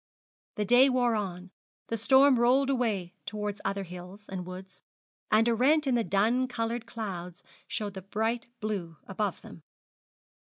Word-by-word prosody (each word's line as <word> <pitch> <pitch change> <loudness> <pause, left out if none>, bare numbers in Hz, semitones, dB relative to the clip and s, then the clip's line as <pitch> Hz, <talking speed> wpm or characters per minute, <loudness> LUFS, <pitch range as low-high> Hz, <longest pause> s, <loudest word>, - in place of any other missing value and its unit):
The 210 - -1
day 250 +6 +6
wore 250 -2 +2
on; 185 -3 -4 0.4
the 230 - 0
storm 265 +3 +5
rolled 265 +3 +4
away 210 -9 -1
towards 210 0 -4
other 200 0 -1
hills 180 +3 -10
and 180 -2 -6
woods; 185 0 -10 0.5
and 220 +2 +4
a 235 - +3
rent 290 +6 +3
in 265 - +1
the 235 -1 +2
dun 220 +8 +2
coloured 235 -1 -3
clouds 180 -7 -6 0.2
showed 205 -2 -3
the 190 - -7
bright 225 +5 -2
blue 190 -7 -3
above 195 -1 -3
them. - - -12
215 Hz, 155 wpm, -29 LUFS, 190-240 Hz, 0.5 s, day